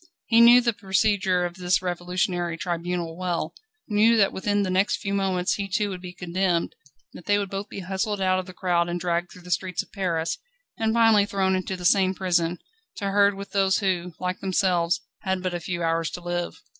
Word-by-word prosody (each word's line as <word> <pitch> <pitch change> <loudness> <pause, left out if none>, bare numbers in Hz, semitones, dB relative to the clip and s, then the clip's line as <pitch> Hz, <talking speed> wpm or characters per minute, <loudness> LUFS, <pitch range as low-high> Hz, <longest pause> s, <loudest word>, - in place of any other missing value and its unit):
He 230 0 +5
knew 240 +1 +8
the 235 -1 +1
procedure 190 -2 +1
of 175 +1 -6
this 180 0 +2
revolutionary 175 -1 -1
tribunal 170 -1 -3
well 175 -3 -2 0.3
knew 220 +2 +4
that 200 -3 +3
within 205 +1 0
the 185 - -2
next 190 +2 +2
few 195 - -4
moments 190 -2 0
he 200 -1 -3
too 205 +2 0
would 180 -1 -6
be 180 -1 -7
condemned, 180 0 -1 0.4
that 180 - -12
they 205 0 +4
would 200 -2 -3
both 195 +1 -4
be 195 - -6
hustled 195 +2 -2
out 185 -1 +2
of 185 - -6
the - - -8
crowd 175 -1 0
and 175 0 -2
dragged 175 0 -1
through 180 - -14
the 180 - -9
streets 185 0 -1
of - - -26
Paris, 170 -5 -1 0.4
and 220 0 0
finally 225 -3 +5
thrown 190 -2 +1
into 185 0 -3
the 180 - -7
same 190 0 +4
prison, 175 -2 0 0.4
to 200 -2 -3
herd 200 0 +4
with 200 0 -8
those 195 -1 +2
who, 180 -3 -1
like 180 0 -3
themselves, 185 -3 +1 0.2
had 190 -2 -2
but 185 -1 -1
a 175 - -2
few 175 0 -4
hours 165 -1 0
to 175 - -7
live. 175 0 -4
185 Hz, 210 wpm, -25 LUFS, 175-200 Hz, 0.4 s, knew